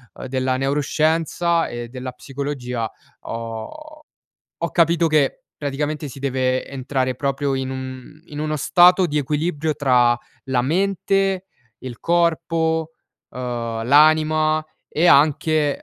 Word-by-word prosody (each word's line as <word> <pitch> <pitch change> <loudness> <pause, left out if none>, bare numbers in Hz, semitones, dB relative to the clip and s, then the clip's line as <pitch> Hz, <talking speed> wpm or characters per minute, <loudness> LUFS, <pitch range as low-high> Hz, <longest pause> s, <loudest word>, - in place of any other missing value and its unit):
uhm, - - -8
della 130 0 0
neuroscienza 155 +4 +1
e 120 -1 -6
della 130 0 -6
psicologia 125 -4 -4 0.3
ho 115 - -7 0.6
ho 170 - -1
capito 170 0 +3
che 150 -3 +1
praticamente 145 +1 -3
si 135 - -11
deve 130 -1 -1
entrare 130 -1 -2
proprio 140 +1 -1
in 130 0 -3
un 130 +2 -8
in 150 -3 -8
uno 155 0 -1
stato 180 +4 +5
di 150 -1 -1
equilibrio 150 +2 -1
tra 125 -4 +3 0.3
la 130 -2 +1
mente, 195 +4 0 0.3
il 125 -3 -8
corpo, 165 -1 0 0.4
uhm, 125 - -9 0.5
l'anima 155 +2 +4 0.2
e 165 +3 0
anche, 150 0 +3
145 Hz, 120 wpm, -21 LUFS, 130-160 Hz, 0.6 s, stato